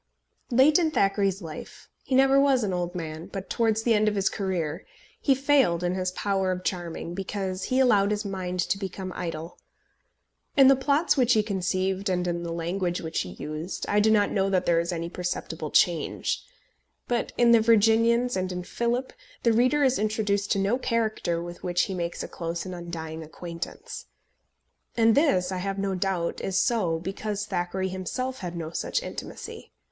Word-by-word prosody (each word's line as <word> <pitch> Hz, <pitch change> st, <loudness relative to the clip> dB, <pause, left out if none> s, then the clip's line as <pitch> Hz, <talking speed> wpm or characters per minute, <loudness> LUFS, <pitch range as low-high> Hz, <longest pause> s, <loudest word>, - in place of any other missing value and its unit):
Late 270 Hz, +6 st, +5 dB
in 330 Hz, -2 st, +2 dB
Thackeray's 195 Hz, -, +1 dB
life, 155 Hz, -2 st, -9 dB, 0.2 s
he 260 Hz, -, -1 dB
never 270 Hz, +1 st, +5 dB
was 275 Hz, -3 st, +3 dB
an 195 Hz, -3 st, -1 dB
old 175 Hz, 0 st, -2 dB
man, 160 Hz, -1 st, -5 dB
but 195 Hz, -1 st, -7 dB
towards 220 Hz, -2 st, +1 dB
the 235 Hz, -, +3 dB
end 215 Hz, 0 st, +3 dB
of 210 Hz, -, +1 dB
his 195 Hz, -1 st, +2 dB
career, 180 Hz, -4 st, -2 dB, 0.4 s
he 275 Hz, -, +4 dB
failed 265 Hz, -, +3 dB
in 175 Hz, 0 st, +1 dB
his 185 Hz, 0 st, -1 dB
power 195 Hz, -1 st, 0 dB
of 180 Hz, 0 st, -3 dB
charming, 175 Hz, -2 st, -3 dB
because 190 Hz, 0 st, -3 dB
he 255 Hz, -, 0 dB
allowed 205 Hz, -6 st, +4 dB
his 210 Hz, 0 st, -1 dB
mind 185 Hz, -2 st, -4 dB
to 195 Hz, -, -1 dB
become 190 Hz, -1 st, -5 dB
idle. 165 Hz, -1 st, -5 dB, 1.0 s
In 270 Hz, -1 st, +8 dB
the 275 Hz, -, +7 dB
plots 280 Hz, +5 st, +2 dB
which 250 Hz, -2 st, +4 dB
he 215 Hz, -, +3 dB
conceived, 190 Hz, -1 st, -1 dB
and 180 Hz, -1 st, 0 dB
in 170 Hz, 0 st, -1 dB
the 170 Hz, -1 st, -4 dB
language 175 Hz, +1 st, -2 dB
which 160 Hz, 0 st, -3 dB
he 90 Hz, -, -5 dB
used, 155 Hz, -, -5 dB
I 205 Hz, -, +3 dB
do 215 Hz, +1 st, +4 dB
not 210 Hz, -2 st, +3 dB
know 195 Hz, -1 st, +1 dB
that 185 Hz, -2 st, +1 dB
there 170 Hz, -1 st, +3 dB
is 170 Hz, +2 st, -1 dB
any 170 Hz, -1 st, -3 dB
perceptible 170 Hz, -3 st, -4 dB
change; 170 Hz, +1 st, +1 dB, 0.6 s
but 240 Hz, -1 st, -1 dB
in 240 Hz, -1 st, +5 dB
The 230 Hz, -1 st, +7 dB
Virginians 230 Hz, +2 st, +4 dB
and 185 Hz, 0 st, -1 dB
in 180 Hz, 0 st, -4 dB
Philip 240 Hz, +6 st, -2 dB, 0.3 s
the 230 Hz, -, +4 dB
reader 255 Hz, +6 st, +3 dB
is 265 Hz, -1 st, +3 dB
introduced 205 Hz, -2 st, 0 dB
to -, -, -1 dB
no 200 Hz, +6 st, +1 dB
character 220 Hz, -9 st, -1 dB
with 175 Hz, 0 st, -8 dB
which 175 Hz, 0 st, +1 dB
he 195 Hz, -, -3 dB
makes 175 Hz, -1 st, -3 dB
a -, -, -5 dB
close 170 Hz, +1 st, -4 dB
and 185 Hz, -, -6 dB
undying 165 Hz, -2 st, -6 dB
acquaintance. 170 Hz, +2 st, -7 dB, 0.9 s
And 225 Hz, -1 st, +5 dB
this, 190 Hz, -, +3 dB
I 185 Hz, -, -2 dB
have 195 Hz, +2 st, -3 dB
no 195 Hz, 0 st, -1 dB
doubt, 185 Hz, -2 st, -1 dB
is 190 Hz, -1 st, -1 dB
so 185 Hz, -7 st, +2 dB
because 200 Hz, +4 st, -4 dB
Thackeray 190 Hz, 0 st, -2 dB
himself 255 Hz, +8 st, -4 dB
had 175 Hz, -2 st, -5 dB
no 160 Hz, -1 st, -5 dB
such -, -, -2 dB
intimacy. -, -, -8 dB
195 Hz, 185 wpm, -26 LUFS, 175-225 Hz, 1.0 s, In